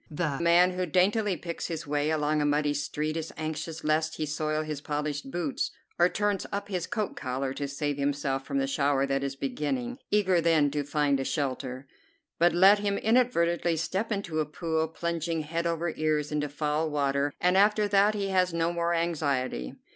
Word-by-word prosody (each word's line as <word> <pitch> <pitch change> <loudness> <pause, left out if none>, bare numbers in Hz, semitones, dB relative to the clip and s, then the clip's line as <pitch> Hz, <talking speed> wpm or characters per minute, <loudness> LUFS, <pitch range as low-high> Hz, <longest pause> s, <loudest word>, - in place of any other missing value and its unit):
The 150 -3 -2
man 170 +2 +5
who 180 0 -2
daintily 190 +3 +2
picks 170 -1 -5
his 165 -1 -4
way 145 +1 0
along 155 -1 +1
a - - +1
muddy 145 0 +1
street 150 +2 -2
is 165 -1 -4
anxious 160 +1 -4
lest 155 +1 +1
he 155 - -2
soil 155 +1 -1
his 150 -2 -5
polished 150 -2 -3
boots, 160 -1 -2 0.3
or 175 +1 +5
turns 205 -1 -1
up 200 0 -3
his 180 -4 -2
coat 215 -4 -2
collar 130 +1 -3
to 140 +1 -3
save 145 +1 -2
himself 140 -1 -1
from 140 0 -3
the 135 - +2
shower 140 0 +1
that 135 0 -1
is 140 0 -3
beginning, 240 - -3
eager 190 -4 +3
then 160 -3 +3
to 145 0 -1
find 145 -1 +1
a - - -1
shelter; 130 -2 -3 0.5
but 175 +1 +5
let 195 +4 +6
him 200 -1 0
inadvertently 175 -8 +2
step 190 +8 -2
into 195 -6 -2
a 155 - +1
pool, 160 +1 -1
plunging 165 0 -2
head 165 +3 -2
over 165 0 -1
ears 155 -1 0
into 150 -1 -1
foul 150 +2 -1
water, 140 -1 0
and 180 +1 +3
after 210 +2 +4
that 205 +1 +4
he 200 -1 -2
has 185 -2 +2
no 165 +1 +1
more 170 0 0
anxiety. 140 - -1
155 Hz, 190 wpm, -28 LUFS, 145-175 Hz, 0.5 s, let